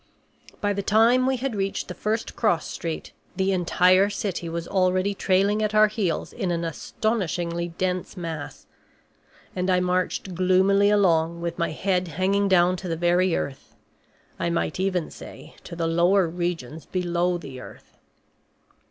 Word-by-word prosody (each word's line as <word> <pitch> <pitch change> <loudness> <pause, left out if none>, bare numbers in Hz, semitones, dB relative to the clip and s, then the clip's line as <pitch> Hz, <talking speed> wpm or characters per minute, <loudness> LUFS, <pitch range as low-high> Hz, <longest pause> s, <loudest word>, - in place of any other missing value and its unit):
By 205 0 +1
the 200 - -2
time 230 +5 +4
we 265 -1 +1
had 260 0 -3
reached 195 -1 -2
the - - -5
first 220 +2 -3
cross 175 -9 +1
street 165 -2 -5 0.2
the 190 0 +1
entire 185 +1 +3
city 195 -4 -3
was 170 0 -4
already 185 +1 +1
trailing 200 +2 +1
at 215 0 -1
our 215 0 +6
heels 200 -6 -2
in 185 - -2
an 170 -1 -1
astonishingly 170 -1 -2
dense 185 +1 -2
mass. 165 -4 -6 0.9
And 185 +1 -1
I 180 -1 +3
marched 180 +1 -1
gloomily 190 +3 +3
along 170 -5 +2
with 170 0 -4
my 170 - +1
head 180 +3 -1
hanging 190 +5 +1
down 180 -1 +4
to 185 - -7
the 165 -1 -2
very 175 +1 +2
earth 135 -1 -5 0.6
I 170 - 0
might 170 +2 -1
even 185 -3 -1
say - - -12
to - - -8
the 165 -1 -2
lower 175 +3 +3
regions 165 -4 -4
below 175 -1 0
the 135 -6 -9
earth. - - -14
185 Hz, 155 wpm, -24 LUFS, 170-200 Hz, 0.9 s, our